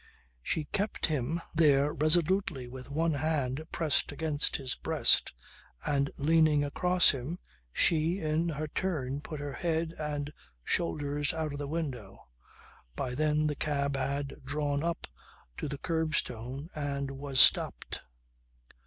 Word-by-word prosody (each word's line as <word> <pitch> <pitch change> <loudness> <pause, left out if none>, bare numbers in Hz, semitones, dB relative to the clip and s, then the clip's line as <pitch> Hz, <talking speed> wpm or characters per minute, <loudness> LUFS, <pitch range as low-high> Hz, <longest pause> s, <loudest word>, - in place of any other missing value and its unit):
She 155 - -1
kept 205 +8 -1
him 155 +2 -1
there 150 -2 +4
resolutely 155 -2 +1
with 130 +1 -9
one 160 +3 +1
hand 145 -2 -1
pressed 160 -3 +1
against 150 0 +1
his 130 -3 -1
breast, - - +3 0.5
and 140 -1 +1
leaning 155 0 +4
across 180 +5 +4
him, 140 +4 -5 0.3
she, 165 - +3
in 160 -1 0
her 155 0 -3
turn 145 -6 -2
put 155 -1 -7
her 145 -1 -5
head 165 -1 -1
and 150 -1 -3 0.3
shoulders 145 - 0
out 155 -2 -2
of 145 - -5
the 145 - -3
window. 135 - -5 0.7
By 125 - -3
then 150 +2 +1
the 150 -1 0
cab 140 -1 -1
had 140 +1 -2
drawn 145 +1 -1
up 170 0 -2 0.5
to - - -3
the 140 0 -4
curbstone 145 -4 -2
and 140 -2 -3
was 135 -1 -2
stopped. - - +4
145 Hz, 135 wpm, -30 LUFS, 140-160 Hz, 0.7 s, there